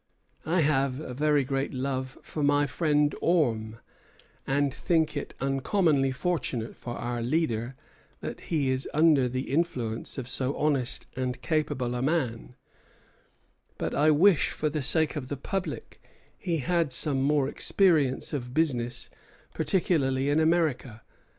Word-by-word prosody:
I 170 +2 +2
have 135 -3 +1
a 140 -5 -6
very 145 +1 +2
great 135 +1 -2
love 130 0 -3
for 155 - -5
my 145 0 +3
friend 150 -1 +1
Orme, 115 -10 +1 0.7
and 140 0 +1
think 160 -1 +1
it - - -5
uncommonly 135 +1 +1
fortunate 130 -6 -2
for 120 -1 -7
our 120 0 -3
leader 120 -2 -1 0.4
that - - -6
he 145 -6 +1
is 130 +1 -2
under 150 -5 +4
the 130 +2 -4
influence 130 -9 -2
of 130 -3 -4
so 130 +1 -1
honest 140 -5 0
and 125 0 -2
capable 145 -6 -1
a 125 - -2
man; 130 -5 -1 1.2
but - - -3
I 150 +2 +3
wish 165 +3 +5
for 155 -1 -2
the 150 0 -2
sake 160 +4 +2
of 140 -4 -4
the 145 - -4
public 195 +7 -5 0.3
he 175 -4 -2
had 165 0 0
some 135 +1 0
more 140 0 +2
experience 155 -6 +2
of 125 -3 -4
business, 125 -6 0 0.5
particularly 145 -5 +1
in 150 - +3
America. 155 -9 +1
140 Hz, 140 wpm, -27 LUFS, 130-155 Hz, 1.2 s, wish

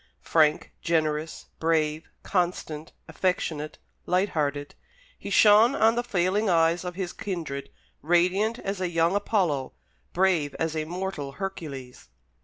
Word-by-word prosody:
Frank, 155 -2 +2
generous, 155 -2 -1
brave, 155 -1 0
constant, 170 -4 -2 0.2
affectionate, 155 -5 -2 0.3
light 185 +3 +2
hearted, 145 -2 -2 0.5
he - - -7
shone 215 +4 +6
on 225 +1 +4
the 240 - 0
failing 195 0 +1
eyes 165 0 +3
of 180 -1 -5
his 185 -2 -4
kindred 160 -8 -5 0.3
radiant 185 - +2
as 195 -4 -4
a 180 - 0
young 165 +2 +2
Apollo, 180 -10 0 0.4
brave 175 -6 +1
as 160 -1 -2
a 155 -1 -1
mortal 175 -5 -4
Hercules. 140 - -7
170 Hz, 125 wpm, -26 LUFS, 155-190 Hz, 0.5 s, shone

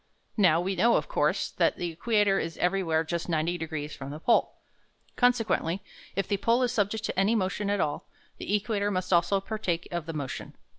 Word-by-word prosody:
Now 175 -6 +5
we 190 +2 -1
know, 235 +4 +4
of - - 0
course, - - 0
that - - +1
the 175 -1 -3
equator 205 +2 +2
is 165 0 -4
everywhere 180 -3 +1
just 170 +2 -3
90 165 +2 0
degrees 155 -2 -4
from 135 0 -7
the 150 +2 -7
pole. 235 - +2 0.6
Consequently, 225 -8 +2 0.4
if 195 - -1
the 200 - 0
pole 230 +5 +2
is 245 - +1
subject 215 -1 0
to 190 - -2
any 205 +4 +3
motion 200 0 -1
at 205 0 +1
all, 145 -4 -2 0.3
the 205 - 0
equator 205 -1 0
must 185 -1 -1
also 175 +3 +3
partake 190 -4 -3
of 170 -2 -3
the 165 - -4
motion. 140 -4 -5
190 Hz, 195 wpm, -28 LUFS, 165-210 Hz, 0.6 s, Now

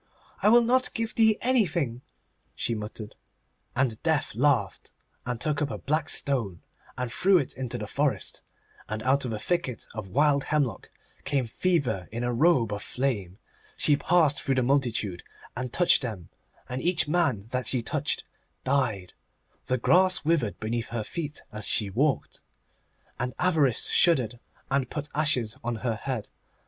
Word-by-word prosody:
'I - - +5
will 240 +2 +7
not 255 +2 +2
give 225 0 -2
thee 220 -1 +4
anything,' 170 - +1 0.5
she 115 - -1
muttered. 105 0 -6 0.6
And 120 -4 0
Death 160 -3 +1
laughed, 120 -5 +1 0.4
and 125 -2 -2
took 150 +1 0
up 145 - 0
a - - -4
black 155 +1 -1
stone, 115 -11 -1 0.3
and 125 -2 -3
threw 190 +5 +4
it 140 -7 -1
into 125 -2 -4
the 105 - -5
forest, 140 +6 -1 0.5
and 110 0 -3
out 135 +2 +2
of 120 - -3
a 110 - -2
thicket 130 -2 -2
of 105 -3 -6
wild 140 +3 +3
hemlock 140 -9 -1 0.3
came 135 -3 0
Fever 130 - 0
in 120 +2 -3
a 120 0 0
robe 125 -5 +3
of 105 - -4
flame. 105 -10 -2 0.4
She 150 - +5
passed 155 -2 +3
through 135 - 0
the 130 - +2
multitude, 120 -8 0 0.3
and 125 0 -4
touched 175 +5 +4
them, 110 - -6 0.4
and 125 +1 -4
each 175 -3 +2
man 150 - +1
that 125 0 -1
she 125 -3 0
touched - - -1 0.4
died. 115 -10 0 0.5
The 130 - +1
grass 185 +7 +3
withered 150 -10 +1
beneath 115 +1 -2
her 115 -2 -3
feet 150 +3 -5
as 105 0 0
she 105 -3 0
walked. 140 +7 0 0.8
And 125 +1 -3
Avarice 160 -9 +2
shuddered, 125 -9 +3 0.3
and 135 -2 +1
put 150 -1 -4
ashes 135 -7 0
on 120 0 -2
her 115 - +1
head. 120 -1 -4
130 Hz, 160 wpm, -27 LUFS, 115-155 Hz, 0.8 s, will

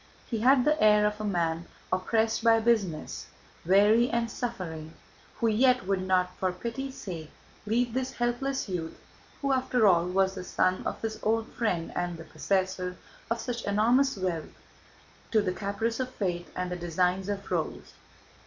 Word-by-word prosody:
He 230 - -3
had 255 +2 +5
the 305 +1 +2
air 210 -1 +6
of 210 0 -1
a - - -3
man 170 -4 -1 0.3
oppressed 220 +4 +1
by 225 -1 +6
business, 215 -9 0 0.4
weary 205 +6 +5
and 235 -1 -1
suffering, 165 -10 -5 0.4
who 230 - +1
yet 250 +1 +3
would 195 -1 0
not, 185 -1 +1
for 185 -1 0
pity's 235 +8 -5
sake, 165 -5 -6 0.4
leave 235 +2 +1
this 260 +1 -2
helpless 245 +3 -1
youth 175 -4 -4 0.5
who, 275 - +2
after 255 -3 +2
all, 175 -3 +5
was 190 +1 +2
the 185 -1 -6
son 185 0 +1
of - - -5
his 220 -1 -3
old 225 +1 +1
friend 180 -8 -1
and 175 -1 -2
the 165 - -8
possessor 185 +2 -1 0.3
of 230 0 0
such 240 -1 -4
enormous 235 +6 +3
wealth, 180 -4 -3 0.7
to 220 - +3
the 185 -3 0
caprice 210 +5 -2
of 255 -1 -1
fate 175 -7 -3
and 180 0 -3
the - - -1
designs 180 +2 0
of 200 -1 -4
rogues. - - -3
205 Hz, 165 wpm, -28 LUFS, 180-235 Hz, 0.7 s, air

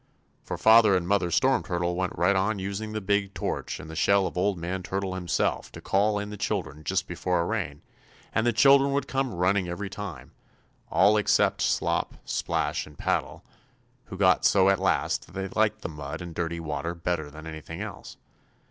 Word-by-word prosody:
For - - -5
Father 110 -3 +6
and 85 -1 -3
Mother 95 -2 +2
Storm 130 +10 +3
Turtle 85 -1 -2
went 95 0 -2
right 95 +3 +3
on 100 +3 +1
using 100 +3 -4
the 110 - -2
big 100 0 0
torch - - -3
and - - -9
the 80 - -8
shell 100 +4 +3
of - - -4
Old 95 +1 +1
Man 90 +3 -3
Turtle 95 +1 -3
Himself 90 -2 -1
to - - -8
call 105 +2 +1
in 105 0 -4
the 105 - -7
children 75 -4 -3
just 95 +4 -1
before 90 +1 -1
a 85 - +1
rain, 70 -3 -3 0.5
and 110 - +2
the - - +4
children 140 +3 +5
would 140 -1 -1
come 135 -1 -1
running 90 +1 +1
every 95 +2 -5
time, 100 -6 -7 0.6
all 105 +3 +4
except 105 - +2
Slop, - - 0
Splash - - -1
and 75 -2 -15
Paddle, - - -2 0.6
who - - -9
got - - +4
so 95 -1 +5
at 95 -1 +3
last 95 - 0
that - - -18
they 95 0 -4
liked 110 +1 +1
the - - -2
mud 75 0 -6
and 85 -1 -7
dirty 85 0 -3
water 85 +2 -3
better 85 -3 -2
than 80 +2 -11
anything 80 +1 -8
else. 105 0 -8
95 Hz, 195 wpm, -27 LUFS, 85-105 Hz, 0.6 s, Father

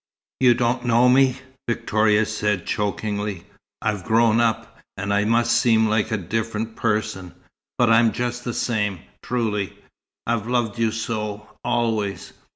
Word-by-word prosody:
"You 125 -2 +5
don't 120 +1 0
know 120 0 +4
me!" 130 0 +4 0.3
Victoria 110 -2 +2
said 105 -3 -1
chokingly. 105 -2 -2 0.4
"I've 105 -4 -1
grown 115 +2 +3
up, 115 -1 -1 0.2
and 100 +2 -2
I 105 +1 +2
must 120 +1 +2
seem 110 -2 +4
like 110 0 +1
a 110 - 0
different 110 +4 -3
person 105 -5 -2 0.4
but 120 -2 +3
I'm 115 0 +5
just 120 0 -3
the 120 -1 -4
same, 105 -6 -1 0.2
truly. 110 -5 -2 0.5
I've 115 -2 -1
loved 120 -2 -1
you 115 -1 +2
so, 105 -2 -4 0.2
always. 115 -4 -1
110 Hz, 140 wpm, -22 LUFS, 105-120 Hz, 0.5 s, You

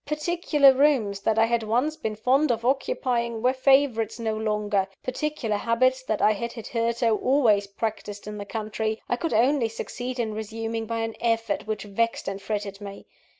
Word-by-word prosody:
Particular 300 -2 +3
rooms 260 -8 +2
that 220 +2 0
I 225 - +5
had 235 0 +1
once 245 +8 0
been 220 -9 -4
fond 260 +6 +2
of 230 0 -2
occupying, 245 - 0
were 255 +1 +4
favourites 260 -5 +2
no 220 -2 -2
longer: 210 -2 0 0.2
particular 255 -5 -2
habits 255 +4 +2
that 215 -4 -1
I 215 - +6
had 235 +3 -3
hitherto 230 0 -1
always 225 -7 +3
practised 205 0 -5
in 210 0 -6
the 200 - -5
country, 215 +1 -3
I - - +1
could 325 +6 -3
only 245 +1 +3
succeed 245 +3 -5
in 220 -2 -1
resuming 225 +1 -4
by 230 0 -2
an 225 0 -3
effort 230 -2 0
which 215 -2 -3
vexed 230 +3 -1
and 195 0 -4
fretted 205 -1 -4
me. 200 -1 -9
230 Hz, 175 wpm, -25 LUFS, 215-255 Hz, 0.2 s, I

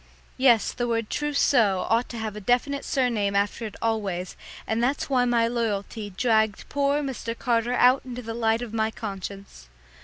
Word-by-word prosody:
Yes, 245 -4 +4
the 240 - -2
word 230 -2 -1
"trousseau" 250 -9 +2
ought 230 +2 +1
to 235 - -6
have 220 -2 -4
a 210 - -7
definite 250 +6 +1
surname 230 -7 0
after 205 +3 0
it 210 - -11
always, 200 -5 -2 0.3
and 225 +1 -1
that's 275 +3 -1
why 250 -2 +3
my 235 -1 +2
loyalty 220 -2 -2
dragged 220 +1 +1
poor 285 +1 +1
Mr. 235 -4 -4
Carter 240 0 0
out 250 +2 +5
into 250 -1 -7
the 225 0 -5
light 225 0 +1
of 230 -2 -8
my 220 -1 +1
conscience. 195 - -8
230 Hz, 175 wpm, -25 LUFS, 210-245 Hz, 0.3 s, out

